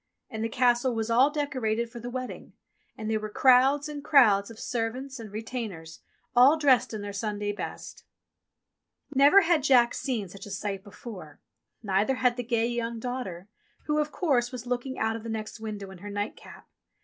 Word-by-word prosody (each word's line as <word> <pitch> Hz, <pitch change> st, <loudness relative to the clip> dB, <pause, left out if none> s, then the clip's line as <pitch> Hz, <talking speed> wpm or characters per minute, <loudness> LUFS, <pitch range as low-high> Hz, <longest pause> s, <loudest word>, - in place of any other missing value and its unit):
And 220 Hz, 0 st, -4 dB
the 225 Hz, -, -1 dB
Castle 245 Hz, +1 st, +2 dB
was 225 Hz, 0 st, -2 dB
all 255 Hz, +5 st, +5 dB
decorated 255 Hz, -6 st, -2 dB
for 240 Hz, -, -8 dB
the 240 Hz, +1 st, -6 dB
wedding, 255 Hz, 0 st, -6 dB, 0.4 s
and 215 Hz, -, -5 dB
there 220 Hz, 0 st, 0 dB
were 215 Hz, 0 st, -5 dB
crowds 265 Hz, +5 st, +4 dB
and 295 Hz, -1 st, -7 dB
crowds 220 Hz, -10 st, +5 dB
of 230 Hz, -, -11 dB
servants 250 Hz, +3 st, -3 dB
and 220 Hz, -3 st, -9 dB
retainers, 210 Hz, -7 st, -6 dB, 0.4 s
all 265 Hz, +6 st, +7 dB
dressed 275 Hz, -5 st, +3 dB
in 215 Hz, -2 st, -5 dB
their 205 Hz, 0 st, -6 dB
Sunday 205 Hz, 0 st, -2 dB
best. 205 Hz, -, -7 dB, 1.1 s
Never 285 Hz, +8 st, +7 dB
had 335 Hz, -3 st, +2 dB
Jack 250 Hz, -3 st, +4 dB
seen 235 Hz, -8 st, -2 dB
such 195 Hz, +3 st, -11 dB
a -, -, -9 dB
sight 195 Hz, 0 st, -4 dB
before; 195 Hz, -7 st, -10 dB, 0.4 s
neither 205 Hz, +5 st, +1 dB
had 250 Hz, -1 st, +2 dB
the 245 Hz, -, -3 dB
gay 230 Hz, -1 st, 0 dB
young 235 Hz, -1 st, -2 dB
daughter 225 Hz, -7 st, -5 dB, 0.4 s
who, 300 Hz, 0 st, +1 dB
of 300 Hz, 0 st, -1 dB
course, 255 Hz, -8 st, +1 dB
was 250 Hz, -2 st, -7 dB
looking 250 Hz, +2 st, -3 dB
out 220 Hz, 0 st, 0 dB
of 225 Hz, -, -6 dB
the 230 Hz, -, -7 dB
next 220 Hz, 0 st, -5 dB
window 210 Hz, -3 st, -6 dB
in 190 Hz, -, -12 dB
her 205 Hz, -, -8 dB
nightcap. 205 Hz, +1 st, -6 dB
235 Hz, 185 wpm, -27 LUFS, 210-260 Hz, 1.1 s, all